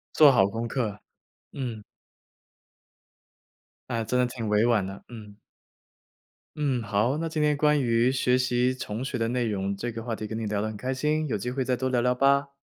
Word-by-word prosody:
做 150 Hz, -2 st, +8 dB
好 95 Hz, -7 st, +4 dB
功 115 Hz, +3 st, -4 dB
课， 110 Hz, -4 st, -2 dB, 0.5 s
嗯。 120 Hz, -6 st, -5 dB, 2.1 s
哎， 115 Hz, -1 st, -1 dB
真 125 Hz, +3 st, 0 dB
的 125 Hz, -, +4 dB
挺 120 Hz, -2 st, -5 dB
委 105 Hz, +2 st, +3 dB
婉 115 Hz, -5 st, +2 dB
的， 95 Hz, +1 st, -8 dB
嗯。 105 Hz, -4 st, -10 dB, 1.2 s
嗯， 135 Hz, -6 st, 0 dB
好， 110 Hz, +6 st, +1 dB
那 165 Hz, +1 st, -2 dB
今 155 Hz, -1 st, -2 dB
天 150 Hz, 0 st, +3 dB
关 150 Hz, 0 st, +3 dB
于 120 Hz, 0 st, +2 dB
学 125 Hz, -1 st, +2 dB
习 125 Hz, 0 st, +1 dB
重 120 Hz, -1 st, -5 dB
学 130 Hz, -1 st, -3 dB
的 115 Hz, -1 st, 0 dB
内 125 Hz, 0 st, 0 dB
容， 100 Hz, -1 st, -1 dB
这 120 Hz, +5 st, -4 dB
个 115 Hz, 0 st, -6 dB
话 115 Hz, -2 st, -3 dB
题 110 Hz, -, -5 dB
跟 110 Hz, +1 st, -5 dB
你 115 Hz, -, -3 dB
聊 105 Hz, -1 st, -1 dB
得 110 Hz, -, -1 dB
很 110 Hz, -, -5 dB
开 130 Hz, +5 st, -3 dB
心， 150 Hz, +3 st, 0 dB
有 110 Hz, -, 0 dB
机 125 Hz, +5 st, -4 dB
会 130 Hz, +1 st, -1 dB
再 125 Hz, 0 st, 0 dB
多 130 Hz, +1 st, -1 dB
聊 125 Hz, -2 st, +1 dB
聊 125 Hz, +1 st, +2 dB
吧。 140 Hz, +2 st, +2 dB
120 Hz, 220 characters per minute, -26 LUFS, 110-130 Hz, 2.1 s, 做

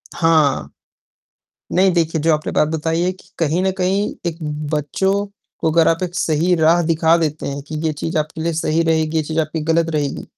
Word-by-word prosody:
हाँ। 155 Hz, -, +2 dB, 1.0 s
नहीं 185 Hz, +1 st, +4 dB
देखिए, 165 Hz, -2 st, 0 dB
जो 160 Hz, 0 st, +3 dB
आपने 155 Hz, 0 st, -2 dB
बात 150 Hz, -, +2 dB
बताई 160 Hz, +1 st, -1 dB
है 180 Hz, +1 st, +1 dB
कि 185 Hz, -, -17 dB
कहीं 165 Hz, +2 st, +1 dB
न 190 Hz, -, +2 dB
कहीं 195 Hz, +3 st, +1 dB, 0.2 s
एक 165 Hz, -1 st, -2 dB, 0.4 s
बच्चों 155 Hz, +6 st, 0 dB, 0.5 s
को 160 Hz, -, +1 dB
अगर 165 Hz, 0 st, +4 dB
आप 165 Hz, +3 st, +1 dB
एक 175 Hz, 0 st, -4 dB
सही 165 Hz, +1 st, +1 dB
राह 165 Hz, +2 st, +4 dB
दिखा 165 Hz, 0 st, +3 dB
देते 155 Hz, -2 st, -2 dB
हैं 140 Hz, 0 st, -4 dB
कि 155 Hz, -, -6 dB
ये 155 Hz, -, +2 dB
चीज़ 160 Hz, +2 st, -3 dB
आपके 155 Hz, +1 st, -3 dB
लिए 165 Hz, 0 st, -1 dB
सही 160 Hz, +1 st, 0 dB
रहेगी, 160 Hz, -1 st, +1 dB
ये 155 Hz, -, +1 dB
चीज़ 160 Hz, +2 st, -2 dB
आपके 155 Hz, +1 st, -2 dB
लिए 150 Hz, -, -5 dB
ग़लत 165 Hz, 0 st, +2 dB
रहेगी, 145 Hz, -2 st, -2 dB
160 Hz, 210 wpm, -19 LUFS, 155-170 Hz, 1.0 s, नहीं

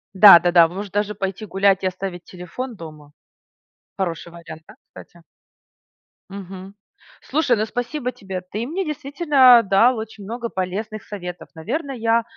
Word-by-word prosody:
Да-да-да. 175 Hz, -3 st, +8 dB
Может, 195 Hz, +2 st, -7 dB
даже 205 Hz, 0 st, -1 dB
пойти 195 Hz, +1 st, -5 dB
гулять 195 Hz, 0 st, +1 dB
и -, -, +1 dB
оставить 185 Hz, -1 st, -6 dB
телефон 190 Hz, +8 st, -8 dB
дома. 155 Hz, -4 st, -12 dB, 0.9 s
Хороший 170 Hz, -3 st, -4 dB
вариант, 165 Hz, -2 st, -11 dB
да, -, -, -14 dB
кстати? 170 Hz, -1 st, -15 dB, 1.1 s
Мгм. 195 Hz, 0 st, -10 dB, 0.5 s
Слушай, 280 Hz, -3 st, +1 dB
ну, 215 Hz, -, 0 dB
спасибо 245 Hz, +3 st, -4 dB
тебе, 190 Hz, -4 st, -7 dB
ты 205 Hz, +5 st, -6 dB
мне 350 Hz, +7 st, -3 dB
действительно 280 Hz, -4 st, +4 dB
дал 225 Hz, +5 st, +3 dB
очень 220 Hz, -2 st, -8 dB
много 235 Hz, +3 st, -5 dB
полезных 200 Hz, +4 st, -5 dB
советов. 180 Hz, -4 st, -8 dB
Наверно, 270 Hz, -, -4 dB
я 230 Hz, -2 st, +1 dB
200 Hz, 135 wpm, -21 LUFS, 180-240 Hz, 1.1 s, Да-да-да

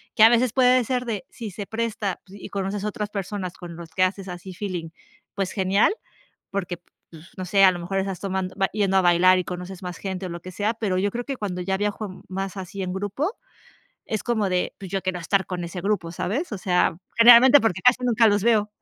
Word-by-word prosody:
que 220 Hz, -, +1 dB
a 225 Hz, -, +10 dB
veces 240 Hz, -1 st, +2 dB
puede 255 Hz, -1 st, +4 dB
ser 250 Hz, +1 st, -2 dB
de, 215 Hz, -5 st, -4 dB
si 225 Hz, -3 st, -7 dB
se 200 Hz, +2 st, -6 dB
presta 220 Hz, -3 st, -3 dB
y 195 Hz, +1 st, -10 dB
conoces 200 Hz, +1 st, -3 dB
otras 210 Hz, -1 st, -3 dB
personas 195 Hz, -2 st, -4 dB
con 175 Hz, -2 st, -9 dB
los 170 Hz, -1 st, -10 dB
que 185 Hz, -, +1 dB
haces 190 Hz, +1 st, -1 dB
así 180 Hz, +1 st, -8 dB
feeling, 180 Hz, -4 st, -4 dB, 0.4 s
pues 195 Hz, -2 st, -2 dB
genial, 195 Hz, -, +2 dB, 0.6 s
porque, 185 Hz, -3 st, -3 dB, 0.3 s
pues, 165 Hz, +2 st, -14 dB
no 185 Hz, -, -4 dB
sé, 195 Hz, +2 st, +3 dB
a 190 Hz, -, +8 dB
lo 175 Hz, -, -5 dB
mejor 195 Hz, +3 st, -2 dB
estás 190 Hz, -1 st, -3 dB
tomando 190 Hz, -1 st, -3 dB, 0.2 s
yendo 195 Hz, -2 st, +2 dB
a -, -, +5 dB
bailar 180 Hz, +1 st, +5 dB
y 180 Hz, -, 0 dB
conoces 180 Hz, +2 st, -7 dB
más 180 Hz, -1 st, -5 dB
gente 190 Hz, -1 st, -5 dB
o 180 Hz, -, -5 dB
lo 170 Hz, 0 st, -7 dB
que 185 Hz, -, -9 dB
sea, 210 Hz, +5 st, -1 dB
pero 205 Hz, -5 st, -1 dB
yo 200 Hz, +1 st, 0 dB
creo 240 Hz, +1 st, -3 dB
que 270 Hz, -1 st, -5 dB
cuando 180 Hz, -4 st, -4 dB
ya 190 Hz, +1 st, -1 dB
viajo 205 Hz, -1 st, -4 dB
más 195 Hz, +1 st, -4 dB
así 190 Hz, +1 st, -6 dB
en 185 Hz, -, -3 dB
grupo, 205 Hz, -, -2 dB, 0.7 s
es 215 Hz, -, -3 dB
como 220 Hz, -5 st, 0 dB
de: 180 Hz, -1 st, -1 dB
"Pues 195 Hz, -2 st, -9 dB
yo 195 Hz, -, 0 dB
quiero 185 Hz, 0 st, -2 dB
estar 190 Hz, +3 st, +1 dB
con 180 Hz, -2 st, -4 dB
ese 175 Hz, +1 st, -6 dB
grupo", 195 Hz, -4 st, -1 dB
¿sabes? 245 Hz, -, -3 dB
O 210 Hz, -, -3 dB
sea, 180 Hz, -3 st, +1 dB, 0.2 s
generalmente 245 Hz, +4 st, +9 dB
porque 185 Hz, -5 st, 0 dB
casi 250 Hz, 0 st, +5 dB
nunca 235 Hz, -1 st, +4 dB
los 205 Hz, -1 st, +2 dB
veo. 215 Hz, -3 st, +3 dB
195 Hz, 225 wpm, -24 LUFS, 185-215 Hz, 0.7 s, a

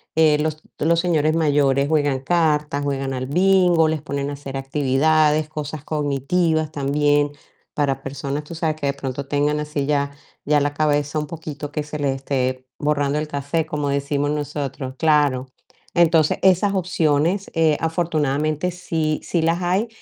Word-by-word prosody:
eh, 155 Hz, -2 st, +5 dB
los 155 Hz, 0 st, -2 dB, 0.2 s
los 165 Hz, +2 st, +2 dB
señores 160 Hz, -3 st, +2 dB
mayores 140 Hz, -3 st, +2 dB
juegan 145 Hz, -4 st, +1 dB
cartas, 150 Hz, -3 st, +1 dB
juegan 135 Hz, -1 st, -2 dB
al 130 Hz, 0 st, -3 dB
bingo, 180 Hz, 0 st, +4 dB
les 155 Hz, -1 st, -1 dB
ponen 140 Hz, -1 st, -3 dB
a -, -, -4 dB
hacer 140 Hz, -1 st, -6 dB
actividades, 150 Hz, +3 st, +2 dB
cosas 150 Hz, -1 st, -6 dB
cognitivas 155 Hz, +2 st, 0 dB
también 145 Hz, 0 st, +1 dB, 0.4 s
para 140 Hz, -2 st, 0 dB
personas, 140 Hz, +2 st, -4 dB
tú 165 Hz, +3 st, -9 dB
sabes, 160 Hz, -1 st, -1 dB
que 145 Hz, -, -2 dB
de 140 Hz, -, +1 dB
pronto 140 Hz, 0 st, -5 dB
tengan 145 Hz, +1 st, +1 dB
así 150 Hz, -2 st, -2 dB
ya, 140 Hz, -1 st, 0 dB, 0.3 s
ya 150 Hz, 0 st, +3 dB
la 145 Hz, 0 st, 0 dB
cabeza 145 Hz, 0 st, 0 dB
un 150 Hz, -, -4 dB
poquito 150 Hz, -2 st, -7 dB
que 150 Hz, 0 st, -2 dB
se 150 Hz, 0 st, -7 dB
les 140 Hz, -2 st, 0 dB
esté 130 Hz, -1 st, -2 dB
borrando 145 Hz, -1 st, 0 dB
el 155 Hz, -, -3 dB
cassette, 145 Hz, +3 st, -2 dB
como 150 Hz, -2 st, -2 dB
decimos 140 Hz, +1 st, 0 dB
nosotros. 145 Hz, -3 st, -4 dB
Claro, 145 Hz, -5 st, +2 dB, 0.5 s
entonces, 165 Hz, -2 st, +4 dB
esas 190 Hz, +2 st, +4 dB
opciones, 175 Hz, 0 st, +1 dB
eh, 160 Hz, -2 st, +3 dB
afortunadamente 155 Hz, -1 st, 0 dB
sí, 160 Hz, -3 st, -2 dB
sí 170 Hz, -, -1 dB
las 165 Hz, +2 st, +1 dB
hay 190 Hz, +6 st, +1 dB
150 Hz, 160 wpm, -21 LUFS, 140-160 Hz, 0.5 s, eh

